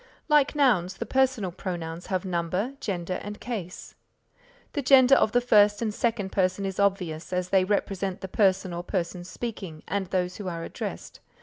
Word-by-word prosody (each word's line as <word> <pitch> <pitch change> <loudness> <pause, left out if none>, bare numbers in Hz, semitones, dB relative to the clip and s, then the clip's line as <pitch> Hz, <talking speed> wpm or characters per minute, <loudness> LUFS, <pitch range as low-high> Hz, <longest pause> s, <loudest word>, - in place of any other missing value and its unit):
Like 300 -2 +4
nouns, 205 -11 +3
the - - -4
Personal 260 -8 +1
Pronouns 170 -2 -5
have 185 0 -1
number, 185 +7 -1
gender 180 -2 -3
and 205 0 -7
case. 200 -8 -6 0.8
The 290 - -1
gender 260 0 +6
of 220 - +4
the 245 - +3
first 210 -3 +5
and 220 -2 -1
second 225 -5 -1
person 185 +1 0
is 190 0 -4
obvious, 180 -5 0
as 180 0 -1
they 190 -1 +4
represent 195 -1 -1
the 190 - -5
person 190 -2 +2
or 170 - -3
persons 180 -1 -3
speaking 190 -8 -6
and 195 +1 -2
those 180 -1 -1
who 205 - -6
are 170 -2 -4
addressed. - - -6
195 Hz, 175 wpm, -26 LUFS, 180-215 Hz, 0.8 s, gender